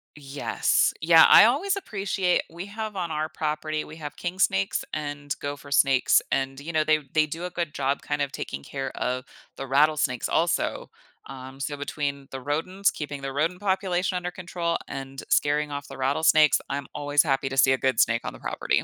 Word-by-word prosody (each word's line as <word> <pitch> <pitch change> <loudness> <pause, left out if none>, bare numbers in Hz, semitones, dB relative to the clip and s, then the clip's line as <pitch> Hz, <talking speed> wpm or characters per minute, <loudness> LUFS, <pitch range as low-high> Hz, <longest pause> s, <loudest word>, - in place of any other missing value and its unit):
Yes. 140 -1 0
Yeah, 165 0 +7
I - - +9
always 370 - +2
appreciate 195 - 0
we 170 +3 -7
have 215 0 -6
on 175 -3 -3
our 155 +1 -2
property 155 0 -3
we 155 - -11
have 150 -2 -7
king 180 +1 -5
snakes 95 - +1
and 145 -2 -4
gopher 145 0 -6
snakes, 135 -2 +4
and, 135 0 -1
you 160 +4 -6
know, 155 -1 +3
they 155 0 +3
they 155 -1 +4
do 165 +4 -5
a - - -3
good 170 -4 -3
job 140 0 -1
kind 145 0 -2
of 140 -1 -1
taking 70 - -6
care 135 -1 -4
of 125 +1 -2 0.3
the 135 - -5
rattlesnakes 145 -2 +2
also. - - 0 0.4
Um, 130 0 -10
so 145 +1 -3
between 140 -1 -4
the 135 - -5
rodents 165 +8 0
keeping 145 -2 -6
the 135 0 -5
rodent 165 +5 0
population 190 -2 0
under 180 0 -3
control, 170 -2 -3
and 135 0 -7
scaring 150 0 +2
off 145 0 -5
the 135 - -10
rattlesnakes, 150 +3 +4
I'm 140 0 -3
always 145 0 +3
happy 135 -2 0
to 135 - -5
see 130 0 +6
a - - +1
good 130 -3 0
snake 115 -1 +3
on - - -5
the - - -12
property. - - -1
145 Hz, 195 wpm, -25 LUFS, 135-170 Hz, 0.4 s, I